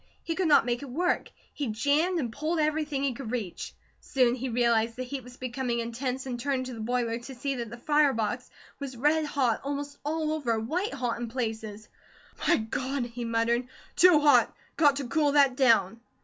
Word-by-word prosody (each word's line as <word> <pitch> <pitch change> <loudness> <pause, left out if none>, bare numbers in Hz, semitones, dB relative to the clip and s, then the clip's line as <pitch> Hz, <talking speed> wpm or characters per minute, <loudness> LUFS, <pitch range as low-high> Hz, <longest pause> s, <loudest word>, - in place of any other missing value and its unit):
He 330 - -2
could 365 +1 0
not 295 - +5
make 240 +1 -1
it 280 - -8
work. 350 +8 0 0.2
He 285 - -3
jammed 290 +11 +1
and 240 -6 -3
pulled 315 +6 -2
everything 305 -2 0
he 275 -2 +1
could 240 -2 -7
reach. 220 -7 -4 0.3
Soon 250 -3 +2
he 260 +1 -3
realized 230 -1 +2
the 255 - -4
heat 265 +1 -6
was 250 +1 -13
becoming 250 -1 -2
intense, 250 +3 -3
and 245 -2 -4
turned 260 0 -1
to 255 - -6
the 230 - -8
boiler 235 0 -1
to 255 +3 -10
see 275 +3 -2
that 235 -2 -4
the 240 - -8
fire 295 +3 +3
box 230 +2 -2 0.3
was 270 -3 -6
red 300 +5 +2
hot 265 -6 0
almost 285 +1 -4
all 310 +1 -1
over, 245 -8 0
white 320 - -2
hot 245 -3 -2
in 240 - -3
places. 220 -3 -4 0.6
"My 345 - +5
God!" 255 +4 -2
he 240 0 -6
muttered. 230 +2 +1 0.3
"Too 355 -3 +7
hot! 290 -1 +5 0.2
Got 290 -3 +4
to 275 -2 -3
cool 295 +1 +2
that 280 -3 +5
down." 230 -5 +3
255 Hz, 200 wpm, -28 LUFS, 235-290 Hz, 0.6 s, Too